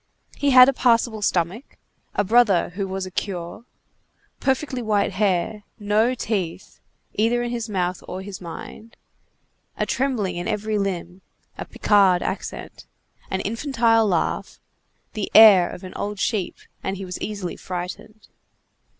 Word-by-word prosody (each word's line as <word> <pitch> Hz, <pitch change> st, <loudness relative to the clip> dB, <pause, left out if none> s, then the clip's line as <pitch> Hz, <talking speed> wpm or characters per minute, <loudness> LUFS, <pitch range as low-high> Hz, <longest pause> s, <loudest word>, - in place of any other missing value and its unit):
He 285 Hz, -, 0 dB
had 255 Hz, -1 st, +9 dB
a 275 Hz, -, +3 dB
passable 230 Hz, -3 st, +2 dB
stomach, 190 Hz, -, -1 dB, 0.4 s
a 205 Hz, -, +2 dB
brother 210 Hz, -3 st, +3 dB
who 195 Hz, +3 st, -4 dB
was 190 Hz, 0 st, -4 dB
a 185 Hz, -, -9 dB
curé, 180 Hz, +3 st, -5 dB, 0.7 s
perfectly 265 Hz, -1 st, -1 dB
white 210 Hz, -3 st, +1 dB
hair, 200 Hz, +1 st, 0 dB, 0.2 s
no 215 Hz, +3 st, +1 dB
teeth, 195 Hz, -7 st, -4 dB, 0.3 s
either 235 Hz, +3 st, +1 dB
in 240 Hz, -, -3 dB
his 235 Hz, -2 st, -4 dB
mouth 180 Hz, -3 st, -2 dB
or 190 Hz, -, -6 dB
his 195 Hz, -1 st, -8 dB
mind, 180 Hz, +6 st, -10 dB, 0.8 s
a -, -, 0 dB
trembling 225 Hz, -10 st, -1 dB
in 175 Hz, -, -4 dB
every 215 Hz, -1 st, -1 dB
limb, 185 Hz, -2 st, -4 dB, 0.3 s
a -, -, -6 dB
Picard 195 Hz, -4 st, +3 dB
accent, 190 Hz, -, -6 dB, 0.4 s
an 190 Hz, -, -2 dB
infantile 230 Hz, -1 st, +1 dB
laugh, 175 Hz, -5 st, -1 dB, 0.5 s
the 210 Hz, -2 st, -3 dB
air 205 Hz, -5 st, +9 dB
of 180 Hz, -, -9 dB
an 185 Hz, -, -8 dB
old 205 Hz, 0 st, -4 dB
sheep, 195 Hz, -1 st, -1 dB, 0.3 s
and 195 Hz, 0 st, -3 dB
he 195 Hz, -, -6 dB
was 180 Hz, -1 st, -7 dB
easily 200 Hz, -4 st, -4 dB
frightened. 185 Hz, +4 st, -7 dB
205 Hz, 140 wpm, -23 LUFS, 185-225 Hz, 0.8 s, had